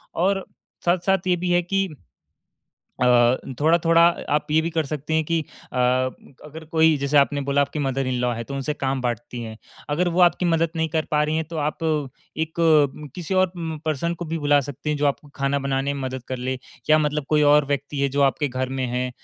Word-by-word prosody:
और 195 +2 +1 0.4
साथ-साथ 185 +1 +1
ये 180 - +3
भी 180 +1 -2
है 175 0 +4
कि 195 +2 0 1.1
अ, 125 0 +5 0.2
थोड़ा-थोड़ा 165 +1 +4 0.3
आप 150 0 +1
ये 160 +1 +4
भी 165 - -2
कर 160 -2 0
सकते 150 +2 -4
हैं 160 - +2
कि 165 +1 +1 0.3
अ, - - -3 0.7
अगर 160 +2 -10
कोई 160 -1 +4
जैसे 140 +1 +1
आपने 145 0 +3
बोला 140 +1 +1
आपकी 140 +2 -2
मदर 135 -1 -1
इन 130 - -1
लॉ 125 -1 +1
है 115 - -4
तो 140 - -7
उनसे 140 +2 -2
काम 135 -2 -2
बाँटती 120 0 -4
हैं। 110 -1 -8 0.3
अगर 165 +5 +1
वो 175 +2 +1
आपकी 180 +1 +4
मदद 165 -1 +2
नहीं 160 0 0
कर 160 0 -1
पा 150 0 +3
रही 155 +1 -1
हैं 160 - -1
तो 165 - -5
आप 150 +2 -2 0.5
एक 160 +1 -3 0.6
किसी 180 +1 -4
और 185 -1 +3
म 160 -2 -4
पर्सन 160 +2 -1
को 175 - -6
भी 165 +1 -3
बुला 145 -1 +4
सकती 145 +2 -6
हैं, 150 - -1
जो 145 - 0
आपको 145 +1 -3
खाना 140 0 0
बनाने 135 0 -1
में 140 - -5
मदद 130 -1 -4
कर 130 - -2
ले 130 +1 -3 0.3
या 155 - +7
मतलब 150 -1 -1
कोई 150 -1 +3
और 150 -1 +4
व्यक्ति 140 0 -3
है 140 - +2
जो 140 +2 0
आपके 140 +2 +2
घर 130 0 -3
में 130 -1 -2
है 125 +1 -2
150 Hz, 220 wpm, -23 LUFS, 135-165 Hz, 1.1 s, या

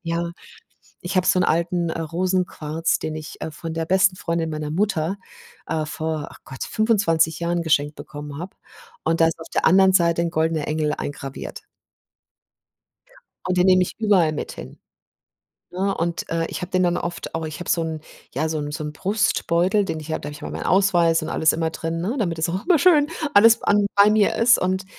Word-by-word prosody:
ja, 170 +1 -2 0.7
ich 180 +2 -5
habe 185 - +2
so 185 - +4
'n - - +3
alten, 170 +1 0
äh, 165 - -3
Rosenquarz, 165 -2 -1
den 155 0 -4
ich, 155 -2 -8
äh, 160 - -4
von 160 +2 -7
der 165 0 -2
besten 190 +1 +3
Freundin 165 -1 -2
meiner 150 -1 -4
Mutter, 190 -1 0 0.5
äh, 155 -1 -1
vor, 155 -1 -4
ach - - -15
Gott, 130 - -7
25 170 -8 +1
Jahren 170 0 -1
geschenkt 145 -2 +1
bekommen 145 -1 -8
habe 180 +3 -8 0.5
und 165 0 +1
da 165 - +6
ist 165 - -3
auf 160 - -10
der - - +1
anderen 190 0 +5
Seite 170 -2 +3
'n 170 -1 -1
goldener 160 -2 0
Engel 150 -1 0
eingraviert. 140 -1 -6 1.9
Und 180 0 0
den 180 - +4
nehme 185 -1 +5
ich - - -3
überall 190 -8 +3
mit - - -5
hin, 65 - -10 0.9
ne? 195 +2 -1
Und, 170 0 -2
äh, 165 0 0
ich - - -5
habe 180 - -6
den 185 0 +2
dann 175 0 +1
oft 175 -1 -5
auch 165 -1 -3
ich 155 +1 -7
habe 175 - -6
so 170 - +2
'n 160 -1 -4 0.3
ja, 155 +4 -1
so 155 - -2
'n 145 0 -4
so 155 +1 -5
'n 150 0 -5
Brustbeutel, 195 0 +1
den 160 - -4
ich 155 +1 -7
habe - - -2
da 145 - -6
habe 145 - -6
ich 145 - -12
immer - - -6
meinen - - -5
Ausweis 175 -4 +3
und - - -5
alles 160 - +2
immer 160 0 -1
drin, 165 +1 -4
ne? 220 +9 -2
Damit 170 -7 -1
das 160 +1 0
auch 185 +3 -3
immer 345 -5 +4
schön 300 -3 +5 0.3
alles 225 +2 +6
an 205 0 +3
bei 200 +1 +6
mir 215 +1 +3
ist. 235 +2 +5
Und, 190 +1 -1
170 Hz, 210 wpm, -22 LUFS, 160-190 Hz, 1.9 s, da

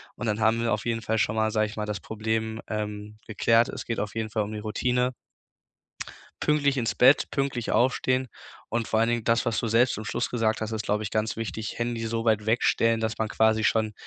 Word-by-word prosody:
und 120 - -4
dann 105 0 0
haben 110 +1 +2
wir 115 - 0
auf 105 - -3
jeden 115 -1 -1
Fall 110 +1 -1
schon 105 0 +1
mal 110 0 +2
sage 110 0 +1
ich 105 +1 -7
mal, 105 - -2
das 105 -2 -4
Problem, 110 +1 -3
ähm, 105 0 -5
geklärt. 115 +2 +3
Es - - -6
geht 115 - -3
auf 105 0 -3
jeden 110 -1 -3
Fall 105 0 0
um 105 - -6
die 105 - -5
Routine. 125 +4 0 1.3
Pünktlich 145 -2 +2
ins 120 -3 -1
Bett, 130 +3 +5
pünktlich 135 -4 -2
aufstehen 130 +1 +1 0.4
und 115 -1 -2
vor 110 - +2
allen 115 - +3
Dingen, 120 -2 0
das, 115 +1 +2
was 115 - 0
du 115 - -2
selbst 120 +3 +3
zum 110 - -6
Schluss 120 +3 -2
gesagt 110 -3 0
hast, 110 0 -3
ist, 110 -1 -2
glaube 105 +1 0
ich, 105 - -4
ganz 110 0 -1
wichtig: 110 -1 -5
Handy 120 -1 -2
so 115 0 -2
weit 110 -2 +2
wegstellen, 115 0 +2
dass 110 0 -2
man 110 - 0
quasi 110 0 +2
schon 110 -1 +2
110 Hz, 230 wpm, -26 LUFS, 110-120 Hz, 1.3 s, Bett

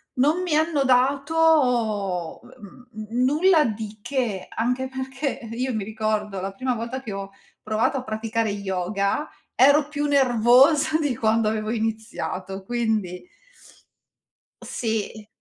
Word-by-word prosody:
non 300 +8 +2
mi 355 -4 -1
hanno 310 -2 +2
dato 255 - +2
ehm, - - -16 0.4
mhmm, 215 0 -8
n - - +3
nulla 310 +4 +4
di 215 -1 -4
che. 240 -9 -2
Anche 250 +3 -1
perché, 265 +1 -4
io 255 +2 -2
mi 215 -2 -2
ricordo, 215 -1 -2
la 195 +1 -4
prima 250 +6 -2
volta 235 +3 -5
che 220 -6 -6
ho 195 0 -6 0.3
provato 215 +5 0
a 260 - -4
praticare 220 -1 -2
yoga, 200 - -2 0.3
ero 285 +3 +5
più 295 -1 -3
nervosa 275 +3 +4
di 290 -5 0
quando 225 0 +1
avevo 215 0 -2
iniziato, 215 -4 -4
quindi 220 - -2 1.3
Sì. 220 -2 -4
235 Hz, 130 wpm, -24 LUFS, 215-270 Hz, 1.3 s, ero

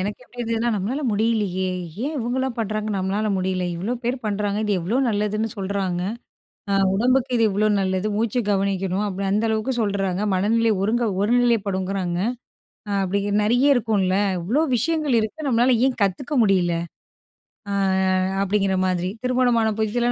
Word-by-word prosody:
எனக்கு 205 +5 -3
எப்டி 245 - -19
இருந்ததுனா, 230 0 0
நம்மளால 220 +9 -2
முடியலையே, 205 -4 0 0.4
ஏன் 305 - -3
இவங்கலாம் 250 +1 -2
பண்றாங்க 215 -1 -2
நம்மளால 195 +3 -1
முடியல? 185 -1 -1
இவ்ளோ 195 +8 -3
பேரு 250 +2 0
பண்றாங்க 205 0 -1
இது 210 - 0
எவ்ளோ 200 +9 -1
நல்லதுன்னு 215 +1 0
சொல்றாங்க 190 -2 -2 0.7
அ - - +1 0.2
உடம்புக்கு 250 +4 +2
இது 225 - +3
இவ்ளோ 210 +2 +1
நல்லது, 190 +2 0
மூச்சு 230 +2 0
கவனிக்கணும் 195 0 0
அப்டி 195 0 -3
அந்த 210 +3 +1
அளவுக்கு 220 +4 0
சொல்றாங்க, 195 -3 -1
மனநிலை 225 +4 +2
ஒருங்க 235 +4 +1 0.2
ஒரு 210 +4 +1
நிலைப்படுங்றாங்க, 195 -5 0 0.7
அ 205 - -2
அப்டி 200 +2 0 0.2
நெறைய 245 +5 +2
இருக்கும்ல, 205 -6 +1 0.3
இவ்ளோ 240 - +1
விஷயங்கள் 300 0 +1
இருக்கு 290 +8 -4
நம்மளால 245 +1 +3
ஏன் 255 -2 -1
கத்துக்க 245 +10 -1
முடியல? 185 -4 +2 1.0
அ - - -2 0.7
அப்டிங்கிற 195 -1 +1
மாதிரி. 180 0 -1
திருமணமான 245 -3 +2
புதிதுல, 240 +3 +1
210 Hz, 145 wpm, -22 LUFS, 195-235 Hz, 1.0 s, இது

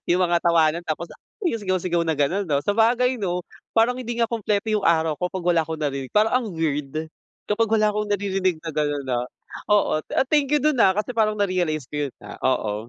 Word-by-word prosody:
Yung 180 +2 +3
mga 170 -1 +2
tawanan 170 0 +3
tapos, 165 +2 -3
ah, - - -18 0.2
yung 230 -11 0
sigaw-sigaw 185 -3 0
na 160 - +1
ganon, 175 +7 0
'no? 140 -1 +2
Sabagay, 235 +4 +2
'no? 180 -2 -1 0.3
Parang 245 +3 +3
hindi 240 -1 -4
nga 230 -2 +1
kumpleto 215 -1 -1
yung 210 -2 +1
araw 160 -2 +2
ko 180 - 0
pag 185 -1 -6
wala 175 -2 +3
akong 160 -1 -5
narinig, 140 -3 -3
parang 215 +1 +3
ang - - -5
weird, 155 -1 -2 0.4
kapag 225 +1 +2
wala 215 -1 +3
akong 210 0 -2
naririnig 195 -3 0
na 165 - -4
ganon 145 -2 -1
na 125 -2 -1 0.5
oo. 205 -6 +3
Ah, 265 - +2
thank 295 -3 +2
you 295 - +4
dun, 305 -4 +2
ah, 190 - +5
kasi 215 +4 -2
parang 215 -2 +1
narealize 180 -8 0
ko 145 -1 -2
yun - - -15
na - - -11
oo. 110 -3 -1
180 Hz, 215 wpm, -23 LUFS, 155-215 Hz, 0.5 s, ah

